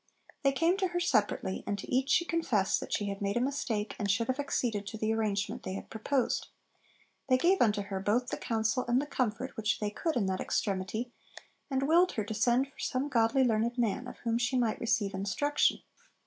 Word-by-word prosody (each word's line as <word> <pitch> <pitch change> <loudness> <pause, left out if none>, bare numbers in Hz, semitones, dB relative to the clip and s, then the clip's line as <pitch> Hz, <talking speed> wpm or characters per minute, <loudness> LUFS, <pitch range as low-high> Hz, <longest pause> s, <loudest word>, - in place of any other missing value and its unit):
They 275 - +3
came 330 +7 +2
to 385 -2 +1
her 350 0 -2
separately, 215 - 0
and 205 - -1
to - - -7
each 260 +2 +1
she 345 - +4
confessed 250 - +1
that - - -8
she 205 - 0
had 200 0 -4
made 200 +2 0
a - - +3
mistake, 240 -5 -2
and 205 - -1
should 225 +5 +1
have 260 +2 0
acceded 230 -7 -1
to 220 - -5
the 220 +1 0
arrangement 210 -2 -1
they 185 - -5
had - - -8
proposed. 250 +4 0 0.8
'They 255 - +5
gave 360 +8 +3
unto 210 -3 +3
her 195 -1 -4
both 225 +6 +1
the - - -3
counsel 225 +2 0
and 240 +1 +3
the 285 - -2
comfort 255 -2 -2
which 220 -1 0
they 210 -1 -2
could 320 +9 -2
in 230 -5 +1
that 190 0 -1
extremity, 205 +4 -2 0.6
and 265 -1 0
willed 340 +5 +4
her 215 - -1
to 210 - -5
send 240 +5 +2
for 275 - -23
some 265 +2 -1
godly 240 +2 +3
learned 235 0 +1
man, 240 +1 0
of - - -9
whom 230 0 +1
she 245 +2 +1
might 235 -3 +1
receive 220 -4 +1
instruction.' 200 +10 +1
235 Hz, 215 wpm, -31 LUFS, 210-265 Hz, 0.8 s, They